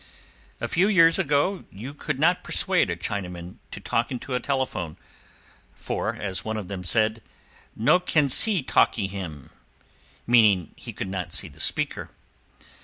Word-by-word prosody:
A - - -3
few 180 +4 +2
years 165 -4 +5
ago 165 +3 +1
you 120 +8 -8
could 150 -1 -4
not 170 +5 +2
persuade 185 - +1
a 85 - -1
Chinaman 90 -1 -5
to - - -8
talk 115 - -1
into 130 +1 -6
a 125 - +1
telephone, 130 - -3 0.8
for, - - -3
as 95 -4 -3
one 110 0 -3
of 100 -4 -6
them 95 -2 -5
said, 110 +4 +1 0.5
"No 145 +11 +3
can 155 -5 +1
see 185 - +6
talkee 115 -4 +2
him," 90 -8 -7 0.7
meaning 105 -8 +4
he - - -9
could - - -6
not 95 -1 -5
see - - -2
the - - -18
speaker. - - -2
115 Hz, 155 wpm, -25 LUFS, 95-150 Hz, 0.8 s, see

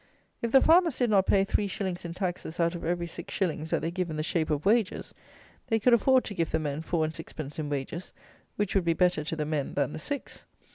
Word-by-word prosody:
If 235 - -1
the 270 - +6
farmers 335 -3 +5
did 245 -3 +1
not 195 -2 +4
pay 195 -1 +4
three 200 +1 0
shillings 185 -3 -4
in 170 0 -5
taxes 175 -3 -4
out 170 0 +2
of 175 - -6
every 175 +1 -1
six 170 0 -8
shillings 160 -4 -1
that - - 0
they 165 - -1
give 180 -1 -2
in 155 - -4
the 155 - -1
shape 160 0 0
of 150 +1 -1
wages, 215 -1 +1 0.5
they 225 -3 +2
could 245 +3 +4
afford 260 +2 +5
to 205 - -5
give 165 -4 -1
the 160 - +1
men 150 -1 -3
four 160 -1 0
and 155 - -4
sixpence 155 -2 -7
in 150 -2 -3
wages, 145 +5 -4 0.4
which 205 -2 -1
would 195 -3 +2
be 165 - +3
better 175 -3 +2
to 160 - -3
the 155 -1 -2
men 150 -2 -2
than 145 0 0
the - - -5
six. 285 - -5
170 Hz, 250 wpm, -28 LUFS, 155-200 Hz, 0.5 s, the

